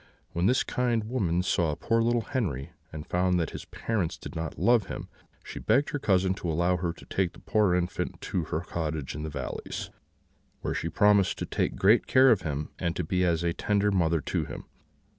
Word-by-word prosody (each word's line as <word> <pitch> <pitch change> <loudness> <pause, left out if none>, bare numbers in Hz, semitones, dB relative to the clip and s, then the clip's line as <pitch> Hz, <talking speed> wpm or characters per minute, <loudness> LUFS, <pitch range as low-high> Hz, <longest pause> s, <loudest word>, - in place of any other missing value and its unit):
When 85 +2 +1
this 125 - +3
kind 120 -3 0
woman 95 -7 0
saw 85 -5 +1
poor 115 +7 +1
little 120 +1 +2
Henri, 85 - -2 0.2
and 75 -1 -7
found 90 0 +1
that 80 - -1
his - - -7
parents 95 -5 -2
did - - -9
not 80 0 -4
love 115 -5 +3
him, - - -6 0.3
she - - -7
begged 130 +7 +2
her 145 - -2
cousin 95 -5 +2
to 85 - -2
allow 85 +3 +2
her 85 0 -1
to - - -13
take 95 -3 -1
the - - -14
poor 105 -4 +2
infant 90 0 -2
to 90 -4 -2
her 75 +1 -2
cottage 80 -5 -3
in 75 - -5
the 80 - -4
valleys, 70 -4 -5 0.7
where - - -2
she 85 - -2
promised 105 +1 +4
to - - -3
take - - -1
great 105 +5 +4
care 130 0 +6
of 105 -5 +3
him, 75 -3 -3
and 85 -2 -1
to 90 - -1
be 90 +3 0
as 85 -2 +1
a 85 -1 +1
tender 105 +2 +1
mother 85 -4 +2
to - - -1
him. - - -7
90 Hz, 210 wpm, -28 LUFS, 80-105 Hz, 0.7 s, care